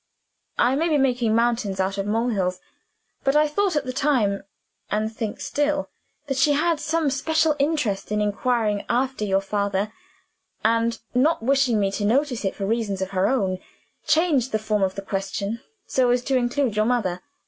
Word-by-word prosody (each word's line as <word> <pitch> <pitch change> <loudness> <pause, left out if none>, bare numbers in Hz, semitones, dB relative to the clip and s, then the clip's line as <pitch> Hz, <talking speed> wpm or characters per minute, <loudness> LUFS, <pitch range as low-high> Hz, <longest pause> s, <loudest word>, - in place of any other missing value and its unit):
I 250 +2 +3
may 330 +4 +1
be 305 - +3
making 245 -5 +2
mountains 230 -4 +1
out 195 +1 0
of 195 - -2
molehills; 210 -5 0 0.6
but 270 +1 +2
I 305 0 +5
thought 370 +4 0
at 295 -2 0
the 255 - -4
time 235 -9 +1 0.5
(and 215 +1 -1
think 220 -3 -4
still) 290 0 -1 0.3
that 270 -2 -2
she 290 +1 +4
had 320 +2 +1
some 315 -2 0
special 315 +3 +1
interest 275 -11 0
in 210 - +1
inquiring 210 0 0
after 255 -1 0
your 195 -1 +2
father, 200 +1 -1 0.7
and, 230 +1 +2 0.2
not 260 +2 +2
wishing 260 -3 +3
me 195 -1 +1
to 205 - -3
notice 250 +3 +1
it 190 - -1
for 195 - -3
reasons 205 -3 -1
of 190 - -6
her 190 0 +2
own, 195 -8 0 0.5
changed 305 -6 +2
the 220 - +2
form 215 -1 -1
of 190 -1 +1
the 195 - -5
question 200 +3 -3 0.2
so 255 -2 +2
as 245 0 +2
to 270 - 0
include 245 -1 +1
your 215 0 +2
mother. 205 -7 0
235 Hz, 180 wpm, -24 LUFS, 205-275 Hz, 0.7 s, I